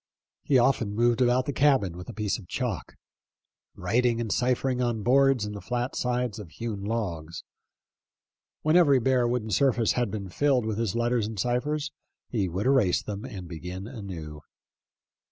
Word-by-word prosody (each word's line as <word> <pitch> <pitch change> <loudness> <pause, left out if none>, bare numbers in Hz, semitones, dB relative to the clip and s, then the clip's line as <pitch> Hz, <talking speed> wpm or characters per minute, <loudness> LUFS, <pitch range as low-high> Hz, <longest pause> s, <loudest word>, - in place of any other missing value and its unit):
He 135 - +3
often 120 -5 +2
moved 120 +1 +2
about 125 +1 +3
the 145 - -2
cabin 130 - +3
with 90 +1 -9
a - - -6
piece 105 0 -1
of 95 - -14
chalk, 115 - -3 0.8
writing 115 +5 +1
and 115 -3 -2
cipher 125 +1 +1
ing 125 -1 -1
on 120 -3 -1
boards 135 -1 +4
and 105 - -5
the 100 - -7
flat 120 +6 -2
sides 125 -3 -1
of 100 -5 -9
hewn 105 +3 -5
logs. 85 -7 -3 1.2
When 155 +2 +3
every 145 -7 +6
bare 125 0 +2
wooden 120 -3 -1
surface 120 -3 +3
had 120 -3 0
been 100 -2 -5
filled 130 +3 +2
with 110 -1 -2
his 115 -4 -1
letters 120 -2 +1
and 110 -2 -6
ciphers 145 +7 -1 0.4
he 100 -6 0
would 95 +6 -3
erase 130 -9 +3
them 105 0 -5
and 95 -3 -7
begin 90 +3 -7
anew. 90 - -7
115 Hz, 170 wpm, -27 LUFS, 100-125 Hz, 1.2 s, every